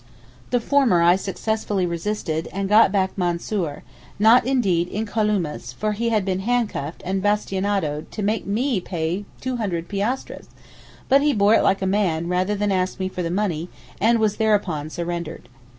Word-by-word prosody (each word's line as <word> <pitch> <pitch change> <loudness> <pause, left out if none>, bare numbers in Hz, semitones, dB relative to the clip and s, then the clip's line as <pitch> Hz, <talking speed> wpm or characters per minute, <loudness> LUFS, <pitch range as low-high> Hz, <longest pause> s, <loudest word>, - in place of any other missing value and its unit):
The 245 - +2
former 240 -9 +3
I 175 +1 +6
successfully 200 0 -2
resisted 170 -2 -2
and 195 +1 -2
got 210 0 +6
back 190 -2 0
Mansoor, 175 -3 -2 0.3
not 225 +3 +5
indeed 195 -10 +2
incolumes 205 - -2
for 215 +7 -1
he 230 +3 -1
had 215 -4 +1
been 190 -1 -1
handcuffed 210 -9 -2
and 190 +1 -1
bastinadoed 195 -6 -1
to 210 - -5
make 210 +1 -1
me 230 +2 0
pay 175 +3 -3 0.2
200 210 -10 -2
piastres, 210 +6 -3 0.6
but 275 +1 +5
he 295 0 +3
bore 205 0 +4
it - - +5
like 195 0 +2
a - - +1
man 185 -4 0
rather 185 +3 +1
than 205 0 0
ask 185 0 -1
me 190 0 -1
for 185 - -5
the 170 - -2
money 180 -3 -1 0.3
and 230 +3 +4
was 215 -2 +1
thereupon 195 -9 +1
surrendered. 170 -4 -5
195 Hz, 165 wpm, -22 LUFS, 175-215 Hz, 0.6 s, I